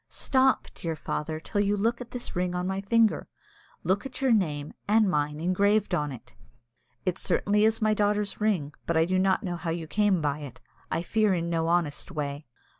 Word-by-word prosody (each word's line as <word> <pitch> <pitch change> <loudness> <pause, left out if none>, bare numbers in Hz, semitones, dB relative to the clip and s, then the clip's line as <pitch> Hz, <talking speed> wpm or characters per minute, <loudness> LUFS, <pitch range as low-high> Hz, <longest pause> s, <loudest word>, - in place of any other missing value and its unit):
"Stop, 265 -1 +2
dear 165 -1 -4
father, 155 +1 -3
till 205 +5 -1
you 205 0 +1
look 230 +4 0
at 240 - -7
this 245 -1 -6
ring 180 0 -1
on 180 0 -1
my 190 +1 -2
finger. 225 +2 +2 0.6
Look 195 +2 +1
at 270 - -6
your 265 -2 +2
name 155 -9 0
and 215 +1 +4
mine 150 -3 0
engraved 200 +5 +2
on 150 -1 0
it." 125 -2 -11 0.7
"It 185 0 -1
certainly 210 +1 +2
is 220 0 +1
my 215 0 +4
daughter's 210 0 0
ring; 180 -10 0
but 170 - +1
I 160 - +4
do 185 +2 +1
not 190 +2 +2
know 175 -3 -3
how 165 0 -4
you 165 0 -2
came 200 +2 +2
by 150 -1 -1
it. 140 -5 -9 0.3
I 165 - -1
fear 215 0 +2
in 170 0 -2
no 165 -1 0
honest 170 -3 0
way." 145 -3 -4
185 Hz, 200 wpm, -27 LUFS, 160-210 Hz, 0.7 s, and